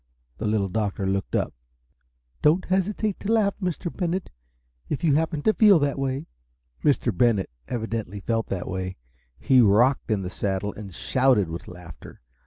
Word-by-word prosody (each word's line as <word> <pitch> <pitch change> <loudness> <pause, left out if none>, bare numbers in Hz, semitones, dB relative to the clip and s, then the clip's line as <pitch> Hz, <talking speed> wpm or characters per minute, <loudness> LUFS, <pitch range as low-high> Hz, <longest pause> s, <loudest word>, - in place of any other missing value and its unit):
The 110 - -2
Little 105 -2 +1
Doctor 100 0 -2
looked 95 0 -1
up. - - 0 0.9
"Don't 160 +5 +3
hesitate 195 +2 0
to 205 - -2
laugh, 215 -3 +3
Mr. 180 -1 -3
Bennett, 180 0 -2 0.6
if 150 - -3
you 155 -4 +4
happen 160 0 0
to 220 - +4
feel 210 -4 +6
that 145 -2 0
way!" 135 +2 -2 0.6
Mr. 125 -7 +2
Bennett 105 - +2 0.2
evidently 110 -4 -4
felt 115 +3 -1
that 90 -2 -4
way. 95 0 -4 0.4
He 130 -2 +4
rocked 120 +6 +3
in 105 -3 0
the 90 - -5
saddle, 100 +1 -2
and 100 -2 -9
shouted 125 0 +2
with 85 +1 -7
laughter. 90 -4 -12
120 Hz, 160 wpm, -25 LUFS, 100-160 Hz, 0.9 s, feel